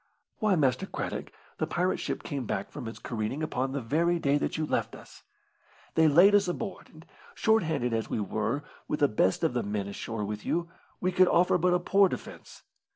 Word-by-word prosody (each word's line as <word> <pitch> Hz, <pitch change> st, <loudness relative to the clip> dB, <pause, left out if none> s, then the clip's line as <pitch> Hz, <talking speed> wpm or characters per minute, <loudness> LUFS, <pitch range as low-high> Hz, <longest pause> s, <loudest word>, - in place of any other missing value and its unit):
"Why, 215 Hz, -4 st, +3 dB
Master 140 Hz, +3 st, +1 dB
Craddock, -, -, -5 dB, 0.3 s
the -, -, 0 dB
pirate 180 Hz, +1 st, 0 dB
ship -, -, -3 dB
came 140 Hz, -6 st, -4 dB
back -, -, -3 dB
from 125 Hz, -6 st, -7 dB
its 115 Hz, -, -7 dB
careening 115 Hz, +6 st, -3 dB
upon 135 Hz, -3 st, -1 dB
the 140 Hz, 0 st, -2 dB
very 170 Hz, +8 st, +1 dB
day 145 Hz, -3 st, +2 dB
that -, -, -2 dB
you 155 Hz, -, 0 dB
left -, -, -1 dB
us. -, -, -14 dB, 0.7 s
They 160 Hz, 0 st, +5 dB
laid 175 Hz, +7 st, +6 dB
us 205 Hz, -2 st, +4 dB
aboard, 190 Hz, +3 st, -5 dB
and, 160 Hz, +1 st, -16 dB, 0.3 s
short 220 Hz, 0 st, +3 dB
handed 150 Hz, -8 st, -1 dB
as 115 Hz, -1 st, -1 dB
we -, -, -1 dB
were, 110 Hz, +7 st, -2 dB, 0.2 s
with 150 Hz, -, -2 dB
the 145 Hz, -, +6 dB
best 100 Hz, -, +1 dB
of 160 Hz, -, +2 dB
the 125 Hz, -, 0 dB
men 100 Hz, -1 st, -3 dB
ashore 105 Hz, +1 st, -4 dB
with 105 Hz, +1 st, -5 dB
you, 170 Hz, 0 st, -1 dB, 0.3 s
we 185 Hz, -, 0 dB
could 185 Hz, 0 st, +5 dB
offer 180 Hz, +1 st, +3 dB
but 180 Hz, +1 st, +3 dB
a -, -, +2 dB
poor 195 Hz, +2 st, +4 dB
defence. -, -, -9 dB
150 Hz, 210 wpm, -28 LUFS, 120-180 Hz, 0.7 s, laid